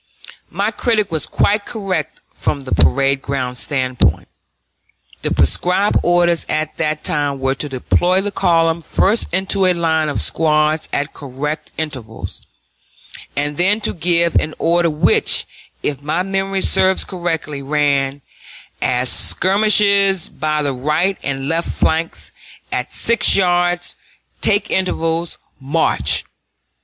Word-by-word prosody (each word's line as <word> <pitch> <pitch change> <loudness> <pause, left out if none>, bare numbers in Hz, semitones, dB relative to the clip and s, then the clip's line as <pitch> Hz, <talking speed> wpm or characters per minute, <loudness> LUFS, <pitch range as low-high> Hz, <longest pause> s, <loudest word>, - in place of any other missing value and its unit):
My 200 +5 -1
critic 215 -4 0
was 160 -2 -2
quite 205 +1 +1
correct 195 -8 -4
from 140 - -2
the 135 - -9
parade 135 - +2
ground 130 -3 -3
standpoint. 130 -3 0 0.9
The - - -1
prescribed 180 - +2
orders 175 -1 +2
at 155 0 -2
that 155 -1 -2
time 145 -2 -1
were 135 0 0
to 145 +2 -5
deploy 175 +8 +1
the 200 +1 -2
column 165 -3 +1
first 205 +6 0
into 190 +1 +1
a 180 - +3
line 160 -2 0
of 145 - -2
squads 155 0 +1
at 145 +2 -2
correct 145 +3 -5
intervals, 130 -8 -6 0.9
and 145 0 -2
then 195 +5 +3
to - - -1
give 170 -1 +1
an 155 - -1
order 170 0 +2
which, 150 -1 +3 0.4
if 140 -2 -2
my 155 +5 -1
memory 195 0 -2
serves 190 0 +3
correctly, 165 -6 -4
ran: 140 -1 0 0.6
"As 125 +1 0
skirmishers, 200 -1 +3
by 155 +1 -2
the 140 -1 -1
right 155 +9 0
and 135 -1 -4
left 165 +2 -1
flanks, 165 +1 -1 0.4
at - - -3
six 235 -1 +3
yards, 175 -2 +1 0.5
take 205 0 +1
intervals, 170 -2 -1 0.2
march." 145 +4 +1
160 Hz, 125 wpm, -18 LUFS, 145-185 Hz, 0.9 s, a